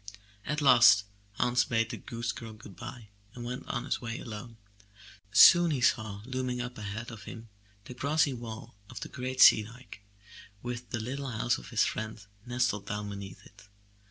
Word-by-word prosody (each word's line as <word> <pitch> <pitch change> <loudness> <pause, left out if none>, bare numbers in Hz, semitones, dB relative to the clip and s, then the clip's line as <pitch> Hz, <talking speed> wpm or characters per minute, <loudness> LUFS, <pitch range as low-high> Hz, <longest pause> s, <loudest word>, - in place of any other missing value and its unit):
At 150 0 -1
last 120 -7 +7 0.3
Hans 125 +4 +2
bade 115 -2 0
the - - -5
goose 115 0 -4
girl 115 -4 -9
good 105 -3 -13
bye 115 -5 -9 0.3
and 120 -1 -7
went 125 +1 -6
on - - -3
his - - -2
way 115 0 -4
alone. 115 0 -8 0.7
Soon 170 - +8
he 145 -4 0
saw 110 -4 0
looming 130 -1 -3
up 125 0 -5
ahead 110 +3 -6
of 105 -5 -10
him 115 -1 -10 0.4
the - - -8
grassy 140 +2 +1
wall 115 -2 -8 0.2
of - - -9
the - - -6
great 130 0 -3
sea 110 - +9
dike, 115 -1 -12 0.6
with 120 0 -5
the 120 - -3
little 135 +4 -4
house 120 - 0
of - - -12
his - - +2
friend 110 -2 -5 0.2
nestled 120 -4 -1
down 105 0 -4
beneath 100 -1 -9
it. 100 +1 -18
120 Hz, 180 wpm, -30 LUFS, 110-125 Hz, 0.7 s, sea